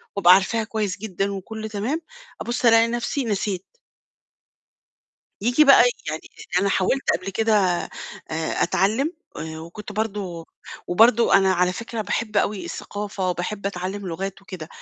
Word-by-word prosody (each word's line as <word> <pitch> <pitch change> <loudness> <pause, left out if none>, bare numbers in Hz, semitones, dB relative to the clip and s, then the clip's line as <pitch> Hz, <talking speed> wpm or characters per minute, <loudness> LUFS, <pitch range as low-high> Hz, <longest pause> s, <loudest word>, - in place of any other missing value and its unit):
وابقى 180 -3 +7
عارفاها 220 +4 +1
كويس 210 -3 -2
جدًا 200 -1 -2
وكُلّه 220 +3 -6
تمام، 220 +10 -2 0.4
أبُص 240 +1 -2
ألاقي 230 0 +6
نفْسي 240 +3 -2
نسيت. 200 -3 -2 1.8
ييجي 245 +7 +4
بقى 275 - +8 0.3
يعني 155 - -4 0.2
لإن 180 +1 -1
أنا 200 - +2
حاولت 200 +8 +1
قبل 185 +2 -6
كده 220 +3 +1 0.8
آآ، 160 0 -1
أتعلم 215 - +1 0.2
آآ، 160 +1 -6
وكنت 190 +6 -9
برضو 195 -6 -3 0.4
وبرضو 225 +5 +5
أنا 195 -1 +5
على 180 0 +2
فكرة 230 +3 -5
باحب 215 0 -2
أوي 200 0 +1
الثقافة 200 -2 -4
وباحب 195 +4 -3
أتعلم 195 +1 -4
لغات 195 +3 -5
وكده. 180 -5 -8
200 Hz, 140 wpm, -23 LUFS, 185-225 Hz, 1.8 s, بقى